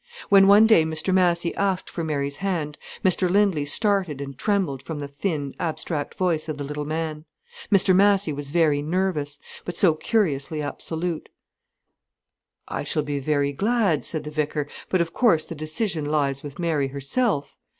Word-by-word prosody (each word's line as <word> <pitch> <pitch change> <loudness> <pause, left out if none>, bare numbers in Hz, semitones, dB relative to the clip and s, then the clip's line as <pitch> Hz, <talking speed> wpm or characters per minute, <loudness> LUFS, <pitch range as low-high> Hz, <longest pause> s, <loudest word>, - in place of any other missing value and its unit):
When 195 -1 +7
one 205 +2 +8
day 220 -8 +6
Mr 160 +3 -2
Massy 175 -2 +2
asked 195 -2 -1
for 170 - -5
Mary's 140 -3 -2
hand, 170 -7 -3 0.3
Mr 185 0 +3
Lindley 190 -6 +2
started 190 -3 +1
and 140 -1 -6
trembled 185 -6 0
from 150 +4 -6
the 145 -1 -5
thin, 140 -1 -3
abstract 155 -2 -3
voice 165 -4 0
of 155 - -3
the 145 - -4
little 150 +1 -4
man. 155 0 -3 0.5
Mr 190 -2 +4
Massy 195 -4 +3
was 145 0 -6
very 155 -2 +2
nervous, 155 -3 -1 0.3
but 175 - -6
so 175 -5 +5
curiously 155 -5 0
absolute. 160 +3 -4 1.4
"I - - -3
shall 155 - -1
be 145 -1 -3
very 140 0 0
glad," 200 - +1
said 155 - -4
the 150 - -7
vicar, 150 -1 -2 0.2
"but 185 - +2
of 165 -1 -2
course 210 -11 +3
the - - -7
decision 155 +2 -2
lies 140 -2 0
with 145 -2 -9
Mary 160 -5 0
herself." 140 - -1
160 Hz, 165 wpm, -24 LUFS, 145-185 Hz, 1.4 s, one